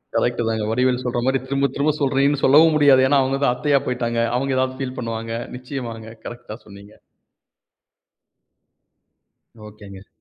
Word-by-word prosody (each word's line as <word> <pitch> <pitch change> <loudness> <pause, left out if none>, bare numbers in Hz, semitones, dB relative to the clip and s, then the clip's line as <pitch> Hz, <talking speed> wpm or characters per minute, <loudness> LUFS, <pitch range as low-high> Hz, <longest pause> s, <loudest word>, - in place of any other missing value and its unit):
Correct 120 0 0
தாங்க. 110 -1 -2
வடிவேலு 125 +1 +1
சொல்ற 120 0 -1
மாரி, 135 0 +1
திரும்ப 140 0 0
திரும்ப 145 +2 +1
சொல்றியேன்னு 140 +1 +1
சொல்லவும் 155 +4 +6
முடியாது. 140 -3 +5
ஏன்னா, 140 0 +3
அவங்க 135 +1 -2
தான் 125 - +3
அத்தையா 140 +2 +1
போய்ட்டாங்க. 120 -1 -2 0.2
அவங்க 135 0 -1
ஏதாவது 130 0 -1
ஃபீல் 130 -1 -5
பண்ணுவாங்க. 115 -1 -5 0.2
நிச்சயமாங்க! 120 -4 -7 0.2
கரெக்டா 120 -2 -9
சொன்னீங்க. 100 0 -14 2.7
ஓகேங்க. 100 -2 -13
125 Hz, 135 wpm, -21 LUFS, 115-135 Hz, 2.7 s, சொல்லவும்